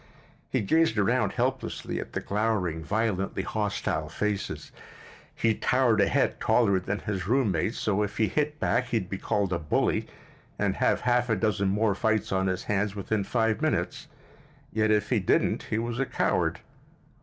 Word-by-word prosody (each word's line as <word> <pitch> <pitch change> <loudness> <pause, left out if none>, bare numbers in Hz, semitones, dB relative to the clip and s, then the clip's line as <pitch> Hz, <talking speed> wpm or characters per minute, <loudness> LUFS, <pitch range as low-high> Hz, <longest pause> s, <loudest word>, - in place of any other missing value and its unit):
He - - 0
gazed 160 +2 +2
around 100 -2 +2
helplessly - - -2
at - - -7
the - - -2
glowering, 100 -6 -1
violently 100 0 -1
hostile 105 -2 -2
faces. 105 -2 -3 0.6
He 115 -1 +2
towered 120 -1 +2
a 100 - +4
head - - +1
taller 100 -6 +3
than 100 +3 -3
his 95 -4 -3
roommate, 110 -5 +1
so 105 -1 0
if 105 -1 -3
he 110 - +3
hit 150 +3 -1
back 125 +1 +1
he'd 115 -7 -2
be 95 - -3
called 100 -4 0
a 85 - 0
bully 75 -2 0 0.5
and - - 0
have - - +2
half 125 -1 +2
a 115 - +3
dozen 100 -1 +1
more 105 +1 +2
fights 110 +2 0
on 95 0 +1
his 95 0 -1
hands 105 0 -1
within 100 +1 -1
five 110 +1 0
minutes; - - -1 0.7
yet 110 0 +2
if 105 -1 +1
he - - +3
didn't - - +1
he 110 - 0
was 115 +1 -2
a 135 - 0
coward. - - 0
105 Hz, 170 wpm, -27 LUFS, 95-115 Hz, 0.7 s, a